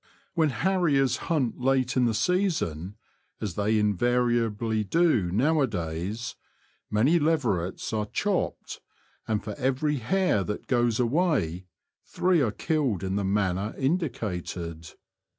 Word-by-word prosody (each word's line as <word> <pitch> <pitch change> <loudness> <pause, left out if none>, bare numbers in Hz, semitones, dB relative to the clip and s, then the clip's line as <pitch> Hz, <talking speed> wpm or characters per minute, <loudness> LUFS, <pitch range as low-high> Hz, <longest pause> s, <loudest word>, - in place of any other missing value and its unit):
When 160 -3 +2
harriers 145 -4 +2
hunt 140 -9 0
late 130 0 +1
in 125 -1 +3
the 115 -2 +1
season 110 - 0 0.2
— - - -45
as 100 -5 -3
they 105 +4 +1
invariably 115 0 +1
do 120 - +2
now 145 - +2
a 135 - +3
days 90 +4 -4 0.3
— - - -39
many 130 +11 +3
leverets 120 - 0
are 105 -1 -1
^' - - -29
chopped," 200 -3 -2 0.5
and 110 -2 -1
for 105 0 -5
every 135 +3 0
hare 160 - +1
that 105 +3 -5
goes 120 -2 +1
away 120 - +1 0.4
three 180 -3 +1
are 120 - +2
killed 135 - -1
in 95 0 -2
the 100 - 0
manner 95 +1 0
in 145 +7 +2
dicated. 90 - -5
120 Hz, 140 wpm, -27 LUFS, 100-150 Hz, 0.5 s, in